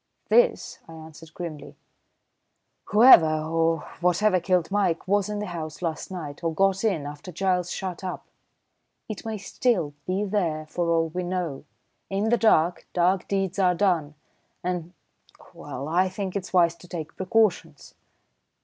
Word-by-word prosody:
"This," 485 0 +2
I 165 - -11
answered 160 0 -12
grimly. 165 -4 -7 1.1
"Whoever, 165 -9 +6
or 165 0 +1 0.2
whatever 185 +2 +3
killed 180 0 0
Mike 190 -4 0
was 205 +1 +1
in 210 - -3
the 210 - -3
house 165 -2 -6
last 165 -2 -3
night, 160 -5 -7
or 165 - 0
got 195 +2 +2
in, 185 -10 0
after 145 +5 -8
Giles 180 0 0
shut 185 -1 -5
up. 185 - -5 0.8
It 215 0 -7
may 220 -1 -3
still 195 - -1
be 190 +3 0
there 175 -7 -1
for 170 +2 -2
all 165 -1 +2
we 180 +3 -3
know. 175 -6 -3 0.4
In 200 +3 0
the 240 - +3
dark, 175 -7 +2
dark 180 +1 +1
deeds 195 -1 -1
are 180 -2 +3
done, 170 -6 +1 0.5
and 175 -1 -3 0.6
well, 135 +3 -7
I 180 +4 +2
think 190 0 -5
it's 195 -2 -4
wise 170 -2 +4
to 180 - -15
take 165 -4 -7
precautions." 185 -6 0
180 Hz, 150 wpm, -25 LUFS, 165-195 Hz, 1.1 s, Whoever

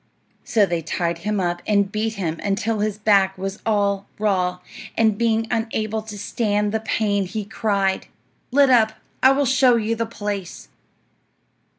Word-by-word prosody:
So 215 -3 +3
they 170 -3 -2
tied 170 +1 -2
him 210 +3 -1
up 175 -1 -1
and 200 -2 +2
beat 220 +1 -2
him 165 -5 -3
until 205 +2 -1
his 210 0 -1
back 195 -2 +3
was 195 +2 -5
all 200 -2 +1
raw, 185 -4 0 0.4
and 220 -2 +3
being 225 0 +1
unable 220 -1 -1
to 215 -1 -9
stand 210 0 -1
the 220 - 0
pain 205 -3 0
he 210 +2 -4
cried, 200 -3 -1 0.4
"Let 275 0 +4
up! 220 -3 +4 0.3
I 260 - +7
will 280 +1 +2
show 260 -1 +4
you 225 0 0
the 230 0 -2
place." 205 -4 -5
210 Hz, 160 wpm, -22 LUFS, 195-225 Hz, 0.4 s, I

